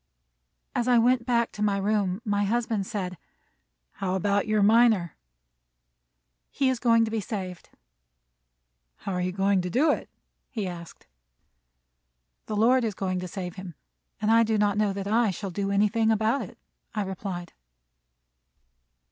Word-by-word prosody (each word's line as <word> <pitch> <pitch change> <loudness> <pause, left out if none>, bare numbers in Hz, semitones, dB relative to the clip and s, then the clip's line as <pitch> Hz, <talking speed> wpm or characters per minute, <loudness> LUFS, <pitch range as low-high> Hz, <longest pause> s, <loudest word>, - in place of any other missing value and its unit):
As 245 0 -1
I 245 -1 +5
went 240 +1 +3
back 235 -2 +1
to 210 - -8
my 205 -1 +2
room, 200 0 0
my 205 -1 +1
husband 220 -2 -1
said: 185 -6 -4 0.7
"How 190 -1 -3
about 200 +2 +1
your 215 -1 +2
miner?" 215 -5 +4 1.3
"He 270 - +1
is 255 -2 -1
going 230 -1 +4
to 220 - -5
be 225 - -1
saved." 185 -4 -6 1.3
"How 195 - -6
are 180 - -1
you 180 0 -1
going 195 0 +2
to 180 - -4
do 290 - +3
it? - - -3 0.4
he 215 -5 -3
asked. 170 -2 -9 1.4
"The 215 - -3
Lord 245 +4 +4
is 215 -4 -2
going 185 -2 -2
to 180 - -5
save 180 -1 -6
him; 185 -3 -8 0.4
and 215 - +1
I 230 0 +6
do 220 -1 +1
not 205 -1 +2
know 210 -1 +1
that 195 0 -5
I 225 +2 +2
shall 195 +1 -5
do 195 +3 -2
anything 210 +3 +2
about 220 +4 +2
it," - - -9 0.4
I 210 - 0
replied. 190 -2 -6
205 Hz, 155 wpm, -26 LUFS, 190-225 Hz, 1.4 s, I